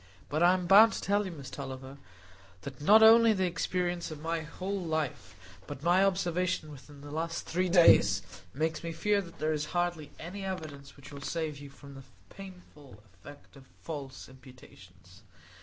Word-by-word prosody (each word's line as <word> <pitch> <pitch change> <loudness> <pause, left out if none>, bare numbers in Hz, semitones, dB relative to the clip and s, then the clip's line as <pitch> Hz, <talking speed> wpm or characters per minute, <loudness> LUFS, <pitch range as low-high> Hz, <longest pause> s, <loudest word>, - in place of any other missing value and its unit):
But 155 +2 -2
I 175 +1 +5
am 180 -1 -4
bound 215 +5 +7
to - - -5
tell 205 +1 +1
you, - - -6
Miss 140 -5 -10
Tulliver, 135 0 -8 0.6
that 135 +3 -9
not 215 +8 +6
only 225 0 +7
the 190 -2 0
experience 175 0 -2
of 155 -2 -8
my 165 +2 -2
whole 185 +5 -5
life, 155 - -4 0.3
but 145 0 -8
my 175 +3 +4
observation 180 -4 -1
within 145 0 -14
the 145 0 -10
last 165 +2 -4
three 180 +2 -1
days, 100 - +5 0.3
makes 160 - -3
me 165 0 -5
fear 205 +4 +1
that 170 -3 -13
there 155 0 -1
is 150 0 -2
hardly 175 -4 -2
any 190 +4 -8
evidence 155 -8 -7
which 140 - -13
will 140 - -9
save 155 -1 -4
you 145 -1 -10
from 140 0 -14
the 135 0 -12 0.3
painful 175 - -14
effect 145 +12 -15
of 135 -1 -15 0.2
false 140 -4 -7
imputations. 95 -8 -17
160 Hz, 175 wpm, -29 LUFS, 140-180 Hz, 0.6 s, bound